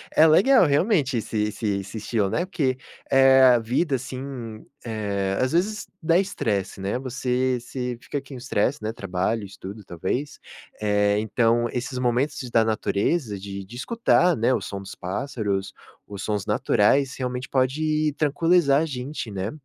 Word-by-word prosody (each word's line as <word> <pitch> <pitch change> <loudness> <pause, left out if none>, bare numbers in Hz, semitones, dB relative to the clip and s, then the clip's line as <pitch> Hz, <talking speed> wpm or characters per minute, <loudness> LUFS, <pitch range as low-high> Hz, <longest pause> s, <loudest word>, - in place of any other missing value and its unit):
é 160 - +7
legal, 195 - +6
realmente, 145 - +2
esse 110 0 -3
esse 105 +2 -3
esse 100 +3 -7
estilo, 105 -2 -1
né, 175 - 0
porque 135 -8 -1 0.3
é 135 0 +6
a 125 -2 +7
vida, 130 +6 0
assim, 125 -3 -6 0.2
eh, 100 -3 -2
as 130 +4 0
vezes 205 +5 0
dá 165 +2 +3
estresse, 105 - -2
né, 100 +6 -2
você 130 -1 -1
se 125 0 -5
fica 145 - -4
aqui 135 0 -13
um - - -6
estresse, 125 +4 -1
né, 110 +1 -2
trabalho, 95 +3 -2
estudo 100 +1 -9
,talvez, 95 - -4 0.4
eh, 105 -1 +2
então 115 +2 +2
esses 125 +1 -3
momentos 125 +3 0
da 115 - +4
natureza, 110 - -1
de 100 0 -7
de 115 +5 -12
escutar, 180 - +2
né, 120 +4 +2
o - - 0
som 100 - -5
dos 100 0 -9
pássaros, 100 -1 -3 0.3
os 100 -1 -7
sons 105 -2 -2
naturais, 130 +4 +2
realmente 125 -1 -3
pode 150 +3 +1
tranquilizar 155 -1 +3
a - - +1
gente, 130 -3 -5
né, 95 +2 -3
125 Hz, 160 wpm, -24 LUFS, 105-140 Hz, 0.4 s, é